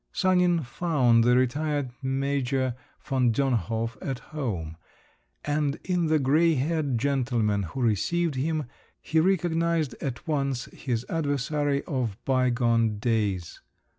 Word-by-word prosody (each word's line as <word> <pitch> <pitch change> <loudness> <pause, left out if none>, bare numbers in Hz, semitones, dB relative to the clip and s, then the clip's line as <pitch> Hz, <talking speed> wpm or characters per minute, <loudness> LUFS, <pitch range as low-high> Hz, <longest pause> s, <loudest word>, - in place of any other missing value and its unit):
Sanin 180 -3 +2
found 125 -4 +2
the 125 +1 +4
retired 145 +1 0
major 135 -1 0 0.3
von 130 -4 +2
Dönhof 115 -3 -1
at 135 -2 -3 0.2
home, 95 - -3 0.7
and 145 -1 0
in 180 -2 0
the 155 0 +3
grey 155 +4 +3
haired 145 -2 0
gentleman 120 -6 +1
who 100 +8 -5
received 160 - +1
him 150 +3 -1 0.3
he 160 - 0
recognised 170 -4 +1
at 125 -2 -5
once 140 -4 -1
his 125 -3 -3
adversary 145 -2 0
of 125 -8 -2
bygone 120 -4 +2
days. 105 -6 -1
135 Hz, 115 wpm, -26 LUFS, 120-155 Hz, 0.7 s, the